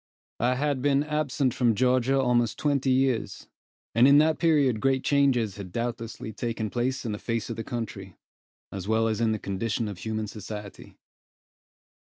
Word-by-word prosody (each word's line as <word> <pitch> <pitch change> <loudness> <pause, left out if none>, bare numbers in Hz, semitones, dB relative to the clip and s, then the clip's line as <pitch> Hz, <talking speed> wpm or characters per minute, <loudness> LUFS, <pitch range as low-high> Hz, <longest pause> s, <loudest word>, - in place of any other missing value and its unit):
I 125 +2 +2
had 140 0 -1
been 140 +1 +2
absent 150 -4 0
from 120 -3 +2
Georgia 130 +2 +2
almost 120 -3 +1
twenty 140 -2 0
years, 130 -3 0 0.5
and 120 +3 +6
in 140 +1 +7
that 155 +1 +3
period 145 -8 +3
great 135 0 +1
changes 130 -8 +2
had 95 -3 -8
doubtlessly 115 0 -4
taken 115 -1 -3
place 125 +2 -1
in 115 - -2
the 105 - -4
face 115 -1 -3
of - - -4
the 115 - -5
country, 105 -6 -6 0.6
as 95 -1 -6
well 110 +1 +2
as 110 0 -1
in 115 -1 +2
the 110 - 0
condition 105 +3 -2
of 100 -4 -7
human 110 +3 -3
society. 105 -1 -9
120 Hz, 170 wpm, -26 LUFS, 110-135 Hz, 0.6 s, in